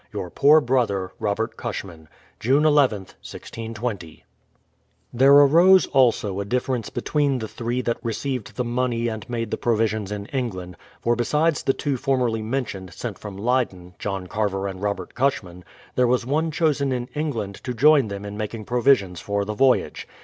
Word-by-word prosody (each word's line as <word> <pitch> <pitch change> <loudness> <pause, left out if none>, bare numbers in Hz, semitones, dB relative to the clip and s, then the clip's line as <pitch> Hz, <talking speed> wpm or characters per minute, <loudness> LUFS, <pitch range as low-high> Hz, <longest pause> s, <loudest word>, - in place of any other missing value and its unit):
Your 90 - -5
poor 150 +3 +5
brother, 115 -8 0
ROBERT 110 +3 -2
CUSHMAN. 90 -8 -6 0.3
June 135 +6 +3
lith, 145 -3 +5
1620. 105 -1 -7 0.9
There 135 +3 +5
arose, 165 +7 +7
also, 115 -7 +2
a - - -1
difference 125 +1 -1
between 140 +2 0
the 110 -3 -4
three 120 +3 -3
that 115 -2 -2
re 115 -1 -2
ceived 130 -3 -4
the 125 - -2
money 120 -1 -1
and 110 -1 -7
made 115 -2 -3
the - - -1
provisions 110 -3 0
in 105 -1 -4
England; 95 -9 -3 0.3
for 120 0 +2
besides 150 +7 +1
the 135 - +1
two 140 -1 -2
formerly 125 -4 0
mentioned, 110 -6 -4
sent 115 -5 -6
from 100 -2 -8
Leyden, 100 -6 -1
— - - -40
John 100 -2 -3
Carver 100 0 -2
and 95 -1 -7
Robert 100 -3 -3
Cushman, 100 -10 -1 0.2
— - - -25
there 125 -1 +3
was 125 0 +1
one 155 +5 0
chosen 150 -3 +1
in 125 -1 -2
England 115 -10 -3
to 125 - -3
join 145 -1 +5
them 100 0 -6
in 100 0 -6
making 110 0 -5
provisions 120 -7 +2
for 100 0 -1
the 105 - -3
voy 130 +4 +4
age. - - -10
120 Hz, 175 wpm, -23 LUFS, 100-135 Hz, 0.9 s, arose